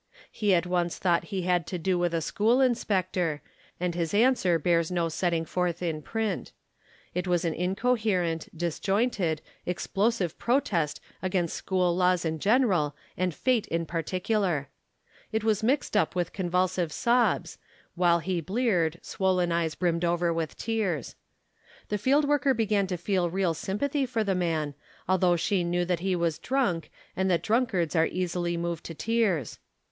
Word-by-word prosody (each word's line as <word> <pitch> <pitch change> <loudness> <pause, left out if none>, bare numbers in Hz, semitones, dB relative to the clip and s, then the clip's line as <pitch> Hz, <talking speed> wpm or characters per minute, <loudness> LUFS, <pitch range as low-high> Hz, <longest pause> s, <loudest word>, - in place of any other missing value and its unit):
'* - - -23
He 205 -3 +2
at 170 0 +1
once 175 -1 0
thought 175 -2 +1
he 195 -3 -3
had 175 -2 +1
to 180 - -3
do 180 +2 0
with 175 -1 +1
a 165 - 0
school 225 +9 +2
inspector, 185 - 0 0.4
and 180 0 -1
his 170 +2 -2
answer 215 -7 +4
bears 165 0 +1
no 170 -2 0
setting 165 0 0
forth 180 +1 -1
in 160 -3 -2
print. 220 +6 -3 0.6
It 180 +1 -2
was 175 -1 +1
an 165 - 0
incoherent, 190 -3 0
disjointed, 175 0 0 0.2
explosive 195 +1 -1
protest 210 - +1 0.2
against 180 -3 -1
school 180 -2 0
laws 180 -1 +2
in 160 -1 -1
general 195 - +2 0.2
and 185 0 0
fate 240 - 0
in 165 0 -1
particular. 175 -2 -1 0.6
It 220 -1 -1
was 220 -1 +2
mixed 255 +1 0
up 205 - +2
with 175 -1 -1
convulsive 180 -2 0
sobs, 240 +8 +1 0.3
while 175 -1 +3
his 180 +1 -1
bleared, 180 -4 +1
swollen 185 -2 0
eyes 170 -2 0
brimmed 170 -1 0
over 170 0 +1
with 165 -2 -3
tears. 205 - -2 0.7
The 210 - -1
field 285 +6 +3
worker 280 -2 +3
began 210 -3 +1
to 180 -1 -2
feel 175 0 0
real 185 -1 0
sympathy 265 - -1
for 230 -3 0
the 200 -2 0
man, 165 -5 -1 0.3
although 185 -1 +3
she 175 +2 +1
knew 175 +1 0
that 175 -1 0
he 185 +1 0
was 170 -3 0
drunk 245 -11 0 0.3
and 190 0 +1
that 175 -2 +1
drunkards 210 - +1
are 160 0 +4
easily 175 -1 -2
moved 170 -1 -3
to 165 - -6
tears. 210 - 0
180 Hz, 160 wpm, -27 LUFS, 170-210 Hz, 0.7 s, answer